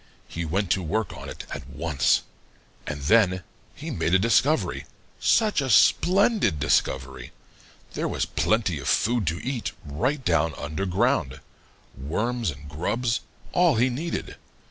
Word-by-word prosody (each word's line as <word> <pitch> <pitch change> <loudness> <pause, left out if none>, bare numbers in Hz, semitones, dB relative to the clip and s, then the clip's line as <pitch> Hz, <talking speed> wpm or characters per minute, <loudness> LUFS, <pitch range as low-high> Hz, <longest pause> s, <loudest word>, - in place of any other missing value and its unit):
He 85 0 -4
went 95 +4 -1
to 95 - +2
work 100 +4 -2
on - - -8
it - - -8
at 65 - -7
once. 75 -1 +1 0.6
And 75 -1 -4
then 95 0 +3 0.3
he - - -6
made 85 - +1
a - - +8
discovery 120 +9 +1 0.3
such 215 -8 +3
a 135 - -2
splendid 185 - +4
discovery! 65 -3 0 0.6
There - - -2
was - - -1
plenty 105 -8 0
of - - -6
food 115 -4 +1
to 85 +2 -1
eat 130 -3 -3
right 130 - -2
down 80 -2 +2
under 75 +6 -3
ground 95 - 0 0.6
worms 110 - -2
and 70 0 -8
grubs 115 - -1 0.3
all 175 -4 +4
he 125 +3 +2
needed. 160 +7 -4
95 Hz, 145 wpm, -25 LUFS, 75-125 Hz, 0.6 s, a